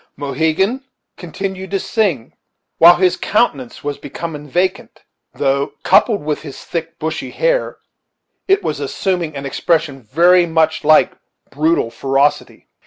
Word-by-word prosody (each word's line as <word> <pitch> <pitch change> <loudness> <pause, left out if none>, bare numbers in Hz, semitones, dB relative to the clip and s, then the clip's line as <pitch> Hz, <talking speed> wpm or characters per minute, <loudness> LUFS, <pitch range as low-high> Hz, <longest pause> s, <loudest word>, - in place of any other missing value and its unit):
Mohegan 160 - 0 0.3
continued 190 +2 -6
to 195 - -1
sing, 185 - -1 0.5
while 170 +1 +9
his 180 0 +2
countenance 145 - -1
was 145 -1 -4
becoming 150 -3 -7
vacant, 185 +6 -2 0.3
though, 140 +1 0
coupled 210 -9 +3
with 150 -1 -2
his 140 -4 -10
thick, 165 0 -5
bushy 160 -1 -4
hair, - - -1 0.7
it 390 +1 +3
was - - -2
assuming 175 -5 -2
an 140 0 -6
expression 150 0 -1
very 175 +9 +4
much 160 -1 +1
like 155 +1 +5 0.4
brutal 150 -4 0
ferocity. 135 +4 -1
160 Hz, 125 wpm, -17 LUFS, 145-185 Hz, 0.7 s, while